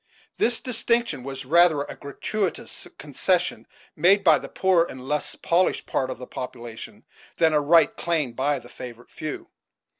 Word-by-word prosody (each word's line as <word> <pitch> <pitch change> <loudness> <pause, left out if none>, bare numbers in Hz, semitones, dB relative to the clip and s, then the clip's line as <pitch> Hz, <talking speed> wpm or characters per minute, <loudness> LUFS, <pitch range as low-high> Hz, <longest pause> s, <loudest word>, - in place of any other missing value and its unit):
This 240 0 +3
distinction 235 - 0
was 135 +1 -6
rather 160 0 +4
a - - -8
gratuitous 185 +7 -3
concession 170 +6 -1 0.3
made 190 +6 +4
by 160 -5 +6
the - - -9
poorer 185 -3 +3
and 130 0 -9
less 150 +1 -1
polished 175 +2 +1
part 130 - -1
of 130 - -5
the 125 - -8
population 120 -3 -8 0.3
than 160 -2 +4
a 150 - +3
right 165 +3 +4
claimed 155 -8 -1
by 140 +3 +1
the 120 -2 -11
favored 120 -1 -10
few. 155 -1 -6
150 Hz, 155 wpm, -25 LUFS, 130-175 Hz, 0.3 s, by